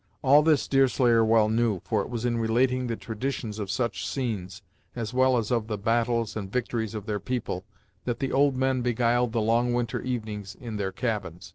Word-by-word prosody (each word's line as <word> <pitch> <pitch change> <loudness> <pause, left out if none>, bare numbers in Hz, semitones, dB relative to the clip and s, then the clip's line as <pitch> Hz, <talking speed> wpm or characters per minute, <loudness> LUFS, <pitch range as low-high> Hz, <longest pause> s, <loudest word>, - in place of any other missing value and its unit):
All 140 +3 +7
this 155 -2 +3
Deerslayer 125 -4 +4
well 110 -1 +4
knew, 110 -3 +1
for 110 -3 +1
it - - -6
was 120 -1 -3
in 120 -1 0
relating 125 +3 +1
the 115 - -2
traditions 110 -1 -4
of 100 -2 -4
such 100 -5 -1
scenes, 100 -6 -4 0.3
as 115 -1 -4
well 130 0 +4
as 115 -1 -2
of 115 -3 0
the 105 -2 -2
battles 115 +1 0
and 100 -3 -5
victories 115 -3 -2
of 105 -2 -5
their 105 -2 -2
people, 105 -4 -3 0.4
that 120 -2 -1
the 135 -1 -2
old 140 0 +3
men 130 -1 +1
beguiled 120 0 +1
the 115 -1 0
long 120 +2 +2
winter 120 -2 -1
evenings 110 -5 -4
in 115 -5 -5
their 95 -2 -2
cabins. 100 -7 -4
115 Hz, 200 wpm, -27 LUFS, 110-125 Hz, 0.4 s, All